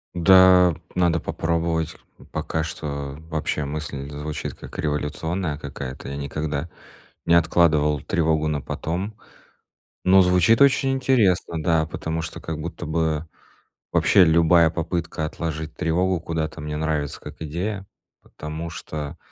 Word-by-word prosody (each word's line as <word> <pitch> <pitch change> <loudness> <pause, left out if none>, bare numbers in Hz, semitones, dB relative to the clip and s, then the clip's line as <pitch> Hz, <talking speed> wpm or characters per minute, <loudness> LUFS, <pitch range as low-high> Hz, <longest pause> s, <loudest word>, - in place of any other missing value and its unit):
Да, 90 0 +6 0.2
надо 85 -2 +2
попробовать. 80 0 -1 0.4
Пока 80 - -2
что 70 -3 -5
вообще 75 -2 -1
мысль 70 -1 -5
звучит 75 +1 -5
как - - -11
революционная 75 +2 -2
какая-то. 70 -3 -7
Я 70 - -5
никогда 75 +2 -3 0.6
не 85 - +3
откладывал 75 -3 +3
тревогу 80 -3 +1
на 75 -1 -1
потом. 95 +9 -4 0.9
Но 95 +1 +6
звучит 90 +5 +4
очень 135 -1 +5
интересно, 105 -11 +2
да, 80 -2 +2
потому 80 +1 -4
что 80 - -6
как 80 -1 -5
будто 85 +2 -6
бы 80 0 -1 0.7
вообще 95 - +5
любая 85 0 +5
попытка 85 0 -3
отложить 80 0 -4
тревогу 90 +1 +1
куда-то 80 -1 -3
мне 75 0 -4
нравится 75 -1 -2
как 75 +1 -10
идея. 95 +6 -4 0.3
Потому 80 +2 -7
что 75 -1 -6
80 Hz, 125 wpm, -23 LUFS, 75-85 Hz, 0.9 s, Да